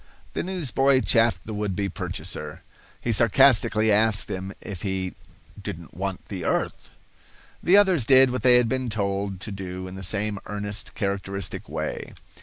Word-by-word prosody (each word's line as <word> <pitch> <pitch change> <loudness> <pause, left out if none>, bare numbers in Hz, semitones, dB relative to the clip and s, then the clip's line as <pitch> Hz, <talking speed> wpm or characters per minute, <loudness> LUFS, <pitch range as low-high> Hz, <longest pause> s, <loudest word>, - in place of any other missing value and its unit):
The - - -1
newsboy 140 -7 +2
chaffed 115 -9 +2
the 110 - -5
would 105 -2 -2
be 100 0 -1
purchaser. 95 - -4 0.4
He 120 - -1
sarcastically 115 -1 +4
asked 105 0 +2
him 95 +1 -4
if 95 -5 -8
he 95 -2 -2 0.5
"didn't - - -7
want 95 +1 -4
the 95 -4 -5
earth." - - -1 0.7
The 185 +4 +5
others 190 - +4
did 130 +1 +6
what 125 -2 -2
they 125 +1 +6
had 125 -1 +4
been 130 +1 -1
told 100 -2 -1
to 105 - -6
do 95 -1 -6
in 90 - -8
the 95 - -7
same 105 +2 -1
earnest, 105 0 -5
characteristic 100 -2 -3
way. - - -4
105 Hz, 160 wpm, -25 LUFS, 95-125 Hz, 0.7 s, did